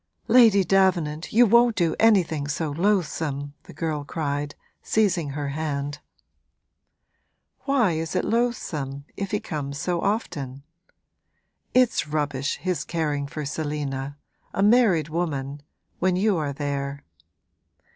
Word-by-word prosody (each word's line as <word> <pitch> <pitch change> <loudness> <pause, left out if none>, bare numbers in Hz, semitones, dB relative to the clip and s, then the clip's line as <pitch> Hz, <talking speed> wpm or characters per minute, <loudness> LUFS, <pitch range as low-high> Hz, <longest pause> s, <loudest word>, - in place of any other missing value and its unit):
'Lady 225 -4 +6
Davenant, 175 -5 +1
you 240 +3 +6
won't 235 +1 +5
do 170 -3 +1
anything 175 -10 +3
so 150 +1 -2
loathsome!' 155 -5 -1
the - - -12
girl 155 -1 -2
cried, 145 -1 -3 0.3
seizing 185 -8 +1
her 145 0 -3
hand. 145 -1 -3 1.7
'Why 265 -9 +3
is 160 0 -3
it - - +1
loathsome, 155 - -1
if 200 -1 -4
he 210 - 0
comes 140 -5 -5
so 175 +2 -1
often? 145 - -2 1.1
It's 250 -10 +3
rubbish, 145 -2 -1
his 180 -2 -2
caring 150 -4 -2
for 150 0 -5
Selina 145 -2 -3 0.4
a 195 - +2
married 205 - +4
woman 145 -4 -3 0.4
when 185 -1 +2
you 200 +2 +2
are 150 -4 -1
there.' 140 0 -3
155 Hz, 120 wpm, -25 LUFS, 145-195 Hz, 1.7 s, Lady